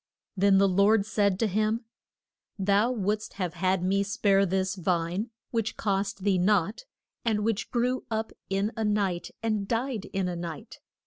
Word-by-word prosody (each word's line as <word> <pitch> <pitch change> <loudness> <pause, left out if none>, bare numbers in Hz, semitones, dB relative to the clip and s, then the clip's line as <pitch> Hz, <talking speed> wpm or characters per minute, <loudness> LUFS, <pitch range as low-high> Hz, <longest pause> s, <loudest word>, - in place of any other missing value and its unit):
Then 195 0 +4
the 195 0 +5
Lord 200 +2 +4
said 205 -3 +1
to 225 - +1
him, 215 +4 0 0.7
Thou 200 +4 +2
wouldst 210 -2 -2
have 180 -4 -3
had 185 +1 0
me 195 +2 +2
spare 200 -1 +2
this 190 +1 0
vine 180 +3 -1 0.2
which 225 -2 -1
cost 195 -2 -1
thee 195 -2 +2
nought, 200 - +1 0.4
and 220 -3 +1
which 225 -1 -1
grew 250 +1 0
up 220 -1 -2 0.2
in 195 +2 0
a 225 - -2
night 200 -4 0
and 215 -3 0
died 235 -1 -1
in 195 -2 -2
a 180 - -3
night. 170 -3 -7
200 Hz, 165 wpm, -28 LUFS, 190-220 Hz, 0.7 s, the